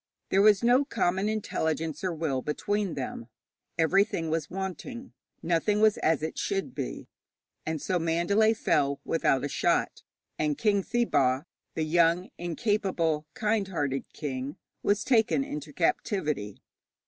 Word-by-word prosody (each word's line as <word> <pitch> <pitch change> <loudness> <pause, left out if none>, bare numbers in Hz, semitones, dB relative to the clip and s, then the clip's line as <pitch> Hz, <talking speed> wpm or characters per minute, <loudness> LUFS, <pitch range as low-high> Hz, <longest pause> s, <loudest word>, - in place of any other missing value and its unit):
There 195 - +4
was 205 -1 +5
no 245 +4 +5
common 200 -7 0
intelligence 160 -7 -2
or 185 - 0
will 155 -5 -1
between 200 +6 -1
them. 125 -4 -5 0.5
Everything 165 -1 +2
was 160 -2 -1
wanting; 195 +7 -6 0.3
nothing 175 +5 +1
was 215 -1 +4
as 155 -1 +1
it 160 - -3
should 195 -1 -2
be. - - -5 0.6
And 160 -1 -1
so 180 +4 0
Mandalay 175 +7 +2
fell 140 -9 +1
without 135 -5 +1
a - - 0
shot, - - 0 0.4
and 150 -1 0
King 205 -3 +2
Thibaw, 160 - +1 0.3
the 160 - 0
young, 170 +2 +2
incapable, 175 -4 0
kind 215 -2 0
hearted 145 -7 -2
king, 135 -1 -5 0.2
was 205 0 +1
taken 245 +2 +3
into 150 - -6
captivity. 150 - -1
170 Hz, 135 wpm, -28 LUFS, 150-205 Hz, 0.6 s, was